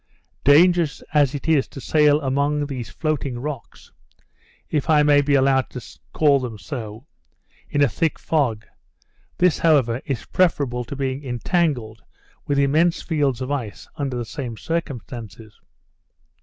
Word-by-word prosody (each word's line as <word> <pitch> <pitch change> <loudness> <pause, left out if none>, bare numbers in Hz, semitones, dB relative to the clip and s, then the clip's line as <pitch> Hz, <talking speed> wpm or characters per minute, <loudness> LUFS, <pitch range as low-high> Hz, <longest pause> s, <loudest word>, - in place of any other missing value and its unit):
Dangerous 165 +2 +4
as 145 -2 +3
it 145 - -6
is 155 -4 +3
to - - -10
sail 150 +1 +3
among 145 +2 0
these 130 -5 -6
floating 145 -5 -2
rocks 140 0 -7 0.8
(if 150 +1 -2
I 150 -2 +5
may 145 -1 +5
be 145 0 +2
allowed 135 -1 +2
to 120 -5 -10
call 145 -3 +3
them 120 -4 -5
so) 115 -2 -7 0.6
in 145 - +2
a - - +5
thick 160 +7 -1
fog, 125 -9 -1 0.7
this, 180 -3 +3
however, 135 -7 +3
is 135 -5 -4
preferable 140 -9 +1
to 130 - -7
being 135 0 -3
entangled 125 - -1 0.5
with 145 - 0
immense 155 +5 +2
fields 140 -6 0
of 130 +2 -3
ice 120 -8 -4
under 140 -5 -3
the 120 - -3
same 120 -2 -6
circumstances. 120 - -6
140 Hz, 145 wpm, -22 LUFS, 125-150 Hz, 0.8 s, I